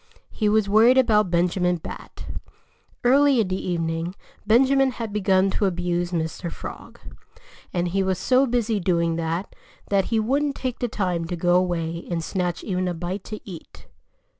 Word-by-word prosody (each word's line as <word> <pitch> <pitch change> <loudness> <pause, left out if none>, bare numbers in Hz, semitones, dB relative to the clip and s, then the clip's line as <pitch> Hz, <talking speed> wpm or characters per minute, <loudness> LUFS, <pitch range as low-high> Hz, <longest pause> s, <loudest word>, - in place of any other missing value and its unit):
He 210 -2 0
was 215 -1 +2
worried 225 +5 +5
about 215 -6 +4
Benjamin 180 +1 +1
Bat. 165 - -9 0.8
Early 275 +1 +5
in 210 -4 +1
the 185 0 -3
evening 165 +1 -2 0.3
Benjamin 265 +4 +4
had 230 -4 -5
begun 195 -2 +2
to 205 - 0
abuse 175 -1 -1
Mr. 165 0 -3
Frog. - - -9 0.7
And 175 0 -1
he 195 +3 0
was 190 -1 0
so 260 +7 +3
busy 230 -3 0
doing 170 -2 +1
that 165 +3 -3 0.4
that 195 -1 +3
he 225 - 0
wouldn't 275 +6 0
take 255 -2 -4
the 245 - 0
time 180 -6 -2
to 175 +2 -4
go 175 +1 +1
away 170 -2 0
and 170 -2 -2
snatch 180 -1 -2
even 185 -2 -1
a 175 - -2
bite 180 +4 -4
to 215 0 -8
eat. 175 -4 -11
185 Hz, 165 wpm, -24 LUFS, 175-220 Hz, 0.8 s, worried